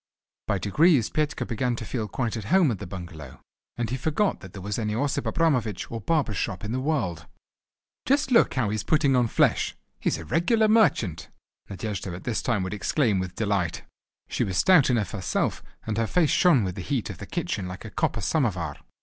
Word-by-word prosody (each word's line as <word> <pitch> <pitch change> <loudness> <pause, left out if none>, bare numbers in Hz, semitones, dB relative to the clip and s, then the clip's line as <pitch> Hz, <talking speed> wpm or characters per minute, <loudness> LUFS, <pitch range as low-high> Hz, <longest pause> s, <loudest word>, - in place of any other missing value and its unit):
By 100 - +1
degrees 125 - +3
Petka 155 0 -1
began 120 +1 -1
to 115 - -6
feel 110 -3 -3
quite 120 +1 -2
at 110 -3 -5
home 175 - +4
at 105 - -4
the 100 - -6
bungalow, 85 -7 -9 0.4
and 120 -2 -2
he 130 - -1
forgot 160 +9 0
that 95 - -11
there 100 - -8
was 105 +3 -2
any 105 -1 -1
Osip 135 -1 -1
Abramovich 120 - 0
or 115 -1 -4
barber's 145 -7 0
shop 100 -2 -3
in 105 - -4
the 125 - -1
world. 120 - -2 0.8
"Just 275 0 +2
look 235 - +4
how 125 -6 +1
he - - -2
is 110 - -2
putting 145 0 +3
on 125 -2 +3
flesh! - - +2 0.2
He's - - 0
a 80 - -8
regular 220 - +2
merchant!" 165 - +2 0.4
Nadejda 100 -3 -4
at 90 - -9
this 120 -3 -1
time 115 -6 0
would 95 - -4
exclaim 105 -1 +1
with 90 -1 -4
delight. 100 -6 -1 0.4
She - - -1
was 95 -3 -2
stout 180 -8 +5
enough 115 -5 +1
herself 95 -5 -1 0.2
and 110 0 -2
her 115 - +1
face 165 +1 +2
shone 170 - +4
with 95 -2 -2
the 95 - -6
heat 115 +2 -2
of 90 - -11
the 100 - -8
kitchen 160 - -3
like 90 +4 -8
a 110 - -8
copper 115 - -1
samovar. 95 - 0
115 Hz, 210 wpm, -26 LUFS, 100-145 Hz, 0.8 s, stout